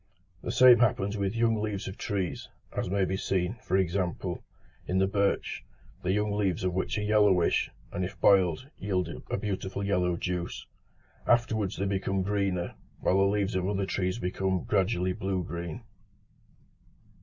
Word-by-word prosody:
The - - -3
same 125 0 +7
happens 105 -3 +2
with 100 +1 -1
young 115 -2 +2
leaves 105 -2 -3
of 95 - -5
trees, 100 -6 -3 0.3
as - - -1
may 100 0 +2
be 95 - -1
seen, 95 +3 -1
for 95 - +1
example, 90 -1 -1 0.4
in 95 - 0
the 95 - +4
birch, 100 0 0 0.4
the 90 - 0
young 105 +1 +1
leaves 100 -4 0
of 90 -1 0
which 95 +4 -1
are 105 - -1
yellowish, 105 -4 +3 0.2
and 90 - -2
if 90 - -5
boiled, 95 - +4
yield 95 -4 -1 0.2
a - - 0
beautiful 100 -1 -3
yellow 90 -3 +1
juice: 90 -1 -3 0.6
afterwards 110 -5 +2
they 100 - -1
become 95 -1 0
greener, 95 -3 -1 0.3
while 95 - +2
the 95 - +5
leaves 100 0 +1
of 95 +1 0
other 100 -1 0
trees 95 0 -1
become 95 -3 -1
gradually 95 -2 +1
blue 95 -1 -2
green. 85 -1 -6
95 Hz, 160 wpm, -29 LUFS, 90-105 Hz, 0.6 s, same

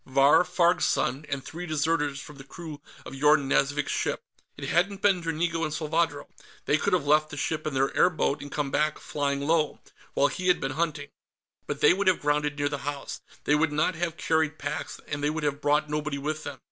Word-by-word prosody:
Vahr 135 +5 +5
Farg's 175 0 +2
son, 140 +5 -1
and 135 -1 -3
three 175 +2 -7
deserters 150 -2 0
from 150 0 -11
the 135 - -10
crew 155 +1 -9 0.2
of - - -8
Yorn 150 +1 +3
Nazvik's 140 +1 +1
ship. - - -1 0.3
It - - -5
hadn't 195 +4 +1
been 195 -3 +4
Dranigo 165 0 -1
and 155 - -1
Salvadro. 155 -1 -1 0.4
They 150 - +3
could - - 0
have 170 -6 +2
left 155 +1 +3
the 145 - -8
ship 155 +2 -2
in 145 - -3
their 135 +1 +1
airboat 155 -5 +2
and 145 0 -8
come 145 -2 -2
back, 155 0 +1
flying 140 -1 -2
low, 155 +1 +1 0.4
while - - +4
he 185 +6 -4
had 180 - +4
been 135 - -2
hunting. 150 -1 -2 0.6
But - - -4
they - - +7
would 195 +1 -1
have 185 - +4
grounded 150 0 0
near 145 -1 +1
the 145 -1 -3
house, 145 0 -5 0.2
they 150 - +2
would 150 +1 +3
not 155 +4 +1
have 170 -1 -3
carried 160 -1 +1
packs, 145 +1 -5
and 145 0 -4
they 145 - +2
would 155 0 -3
have 145 0 -1
brought 150 +1 +2
nobody 150 -1 -2
with 150 +2 -3
them. 145 -2 -6
150 Hz, 215 wpm, -27 LUFS, 145-165 Hz, 0.6 s, they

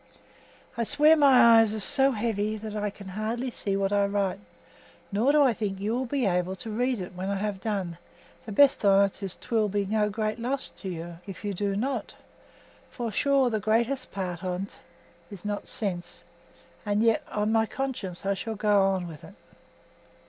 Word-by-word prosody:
I - - +2
swear 300 +7 +5
my 255 -6 +7
eyes 220 -1 +3
are - - -3
so 270 +6 +4
heavy 215 -3 -1
that 215 0 -7
I 210 0 -1
hardly 215 +6 -4
see 200 -3 -2
what 195 0 0
I 200 0 +3
write, 200 -1 -1 0.7
nor 220 +8 +3
do 295 0 +5
I 260 -4 +4
think 200 -3 -3
you 210 +3 -1
will 255 +1 -1
be 270 -1 0
able 180 0 0
to 225 +3 -6
read 245 +2 0
it 180 -1 -6
when 185 +2 -4
I 200 - 0
have 200 -1 -3
done; 190 -6 -3 0.5
the - - -5
best 275 +5 +4
on't 200 0 +3
is 195 -2 -4
'twill 220 -3 0
be 200 0 -1
no 210 +1 +1
great 215 +2 -2
loss 260 +4 0
to 195 - -8
you 170 -1 -7
if 195 +1 -8
you 205 - -1
do 200 +1 -1
not, 265 +7 -3 0.7
for, 235 -3 -4
sure, 270 +3 +2
the 220 - 0
greatest 235 +5 0
part 180 -2 -4
on't 185 +1 -4 0.5
is 200 -1 -10
not 205 0 -3
sense, 180 -5 -4 0.6
and 205 +1 +1
yet 225 -1 +3
on 210 +1 -1
my 225 0 +2
conscience 225 -11 -5
I 200 - +2
shall 220 +3 -5
go 205 -1 +3
on 190 -2 +1
with 155 -3 -10
it. - - -13
210 Hz, 190 wpm, -27 LUFS, 195-230 Hz, 0.7 s, my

